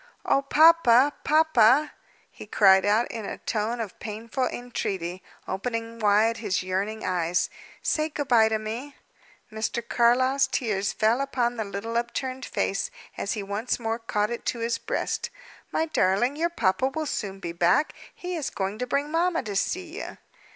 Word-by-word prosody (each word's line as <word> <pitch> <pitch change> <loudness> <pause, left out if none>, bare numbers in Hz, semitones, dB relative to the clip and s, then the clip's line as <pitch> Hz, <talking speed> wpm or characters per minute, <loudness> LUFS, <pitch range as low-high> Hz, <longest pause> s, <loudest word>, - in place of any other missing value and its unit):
"Oh, 275 - +3
papa! 290 -3 +5
Papa!" 300 -3 +4 0.4
he - - -11
cried 195 -2 +5
out, 215 +4 +3
in 225 - -5
a - - -5
tone 225 +2 -2
of 220 -4 -6
painful 230 +4 -3
entreaty, 190 -7 -4 0.3
opening 230 +2 -4
wide 215 +2 +3
his 205 -5 -1
yearning 195 +4 -2
eyes, 175 -1 0 0.3
"say 310 0 0
good 290 -2 -4
bye 225 -3 +5
to 220 - +1
me!" 230 +7 -6 0.6
Mr. 220 +2 -3
Carlyle's 255 +3 +3
tears 210 -7 -1
fell 225 +4 +2
upon 245 -3 0
the 220 - -1
little 210 +3 -4
upturned 255 +2 -3
face, 195 - -1 0.3
as 200 - -2
he 210 -3 -4
once 205 +6 -2
more 225 0 -2
caught 210 -1 -1
it 235 - -4
to - - 0
his 230 0 -1
breast. - - -2 0.4
"My 320 - +1
darling, 245 - +1
your 335 +3 0
papa 235 - +1
will 310 +4 -3
soon 195 -8 -4
be 170 - -5
back. 175 - +2 0.2
He 360 0 -5
is 310 -5 -2
going 195 +2 -4
to 250 - -2
bring 285 +3 -1
mamma 335 0 +1
to 210 -3 -5
see 360 - -2
you." - - -8
230 Hz, 165 wpm, -26 LUFS, 210-270 Hz, 0.6 s, papa